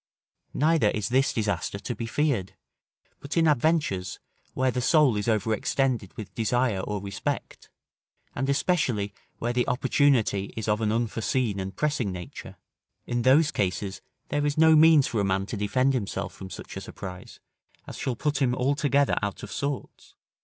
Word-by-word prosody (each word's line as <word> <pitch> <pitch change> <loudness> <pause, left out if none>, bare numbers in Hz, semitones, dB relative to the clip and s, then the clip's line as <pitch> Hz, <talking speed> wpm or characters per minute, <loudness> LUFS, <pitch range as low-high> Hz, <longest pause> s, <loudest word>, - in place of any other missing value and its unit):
Neither 155 -5 +3
is 105 +1 -2
this 130 +2 +3
disaster 100 -4 -2
to 120 - -4
be 115 - -5
feared, 115 -8 0 0.6
but 140 +4 -5
in 165 -1 +4
adventures, 145 - +1 0.4
where 130 0 +2
the 125 - -2
soul 145 -2 +4
is 105 +1 -2
overextended 110 +1 0
with 110 - -8
desire 115 -1 +1
or 105 +2 -3
respect, 100 0 -5 0.6
and, 135 +2 -2
especially, 130 - +1 0.2
where 120 +1 -2
the 125 0 +1
opportunity 125 -6 +1
is 110 - -3
of 105 +1 +1
an 105 -1 +1
unforeseen 115 -1 -1
and 95 0 -5
pressing 145 -8 0
nature; 90 -2 -8 0.5
in 120 0 -1
those 145 +5 +4
cases, 95 0 -2 0.3
there 145 0 0
is 145 0 0
no 160 0 +6
means 155 -2 +7
for 110 -4 -1
a - - 0
man 95 0 0
to 110 - -5
defend 130 +7 +1
himself 110 -7 -3
from 95 - -9
such - - -9
a - - -5
surprise, 90 -1 -9 0.5
as - - -8
shall 130 - -2
put 145 +2 -1
him 125 -2 +2
altogether 140 +1 +2
out 100 -1 -4
of 105 - -7
sorts. 140 -1 -5
120 Hz, 165 wpm, -26 LUFS, 100-140 Hz, 0.6 s, means